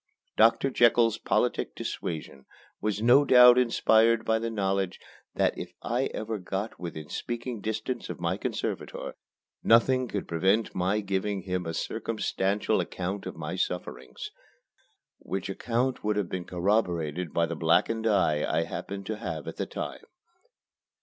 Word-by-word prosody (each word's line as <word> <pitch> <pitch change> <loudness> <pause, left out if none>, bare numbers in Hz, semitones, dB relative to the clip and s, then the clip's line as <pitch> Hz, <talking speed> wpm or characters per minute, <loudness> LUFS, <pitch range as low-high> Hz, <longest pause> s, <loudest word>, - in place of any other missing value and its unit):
Doctor 115 +5 +4
Jekyll's 120 -2 +4
politic - - 0
dissuasion 75 -4 -5 0.3
was 105 0 -1
no 125 +5 +7
doubt 125 -2 +8
inspired 115 -1 +3
by 110 0 +2
the 115 +1 -2
knowledge 95 -3 -1 0.4
that - - +2
if - - -7
ever 115 -3 -2
I - - -10
got 95 +4 -4
within 80 -4 -6
speaking 120 -1 -4
distance 110 +3 -3
of - - -6
my 85 +1 0
conservator, 100 - -4 0.5
nothing 125 +3 +4
could 100 -4 -4
prevent 95 +7 +1
my 95 +4 0
giving 100 0 -2
him 90 -2 -3
a 80 - -3
circumstantial 105 -3 -1
account 95 +2 -3
of - - -6
my - - -5
sufferings 65 -1 -4 0.9
which 95 0 -4
account 120 +5 -1
would 105 0 +1
have 100 -4 -1
been 90 -1 -4
corroborated 90 -4 0
by 85 - +2
the 85 0 -4
blackened 85 +8 +2
eye 80 -8 +2
I 80 +1 +1
happened 100 +4 -6
to 110 - -3
have 115 - -5
at - - -6
the - - -2
time. - - -5
105 Hz, 145 wpm, -28 LUFS, 90-115 Hz, 0.9 s, doubt